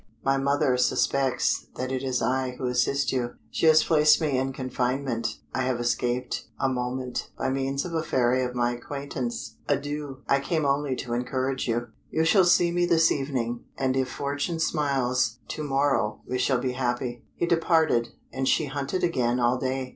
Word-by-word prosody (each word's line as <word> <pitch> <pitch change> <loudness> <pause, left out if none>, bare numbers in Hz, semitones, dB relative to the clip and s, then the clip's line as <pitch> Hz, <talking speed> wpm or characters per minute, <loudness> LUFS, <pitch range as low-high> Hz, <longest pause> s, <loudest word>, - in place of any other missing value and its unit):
"My 135 0 +3
mother 140 -1 +2
suspects 130 +1 +1
that 130 +1 -3
it 130 -1 -1
is 130 -2 -1
I 130 -1 0
who - - -4
assist 130 +2 +1
you: 120 -2 -2 0.2
she 165 - +1
has 155 0 +7
placed 150 -1 +5
me 150 -4 0
in 135 +1 0
confinement. 130 -1 -2 0.2
I - - 0
have 130 -2 0
escaped 120 +1 -1
a - - +2
moment, 125 0 -3
by 130 - -1
means 135 +2 -1
of 175 - -5
a 160 - +1
fairy 130 -4 +1
of 125 0 -3
my 120 0 +1
acquaintance. 120 -3 -5
Adieu! 145 -2 -2
I 140 - +3
came 155 +2 -1
only 140 -1 +1
to 120 -1 -5
encourage 130 +2 -1
you. 120 +1 -1 0.2
You 160 +1 +1
shall 185 +2 +5
see 175 0 +4
me 175 0 +1
this 165 -1 +4
evening, 125 -4 -2
and 130 -1 0
if 130 -1 0
fortune 145 +5 -2
smiles, 130 -7 +1
to 155 - -4
morrow 135 -6 +1
we 125 0 -2
shall 130 0 +2
be 130 +1 -1
happy." 120 -1 -2
He - - 0
departed, 160 -8 +2 0.2
and 135 0 -1
she 155 - +3
hunted 140 +6 -3
again 125 -8 +1
all 120 +1 +2
day. 130 0 -2
130 Hz, 180 wpm, -26 LUFS, 125-145 Hz, 0.2 s, has